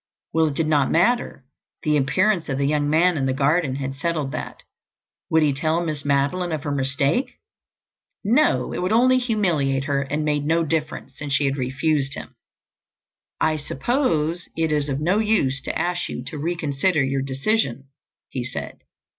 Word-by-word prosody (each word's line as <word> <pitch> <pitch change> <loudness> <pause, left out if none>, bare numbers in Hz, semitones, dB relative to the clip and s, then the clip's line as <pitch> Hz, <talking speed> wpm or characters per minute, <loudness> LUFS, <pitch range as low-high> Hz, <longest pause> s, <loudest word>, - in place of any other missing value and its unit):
Well, 160 -1 +3
it 145 - -3
did 165 - +1
not 150 -3 +2
matter—the 160 - -1
appearance 175 +6 +1
of 135 - -1
the 140 - +1
young 145 0 +1
man 165 +3 +3
in 135 - 0
the 130 - +1
garden 145 0 +2
had 135 -1 -3
settled 150 -1 -2
that. - - -6 0.7
Would 160 -1 +4
he 145 -2 +3
tell 155 +4 0
Miss 150 -3 -3
Madeline 145 +6 +1
of 155 -2 -3
her 145 - -2
mistake? 140 - 0 0.9
No, 220 - +2
it - - -3
would 180 +2 -1
only 255 +3 +5
humiliate 170 - +1
her 140 -1 0
and 145 +3 -2
it - - -3
made 150 -1 0
no 165 +1 +2
difference, 155 -1 -3
since 145 -2 -3
she 140 +1 +2
had 135 0 +1
refused 135 +2 0
him. - - -9 1.0
"I 155 0 +2
suppose 165 - -1
it 160 -1 +1
is 150 -1 0
of 135 0 -1
no 180 +7 +2
use 205 -12 +1
to - - -2
ask 175 0 -1
you - - -5
to 155 - -7
reconsider 155 0 0
your 135 0 0
decision?" 135 - -1 0.4
he - - -4
said. - - -6
150 Hz, 175 wpm, -23 LUFS, 140-175 Hz, 1.0 s, only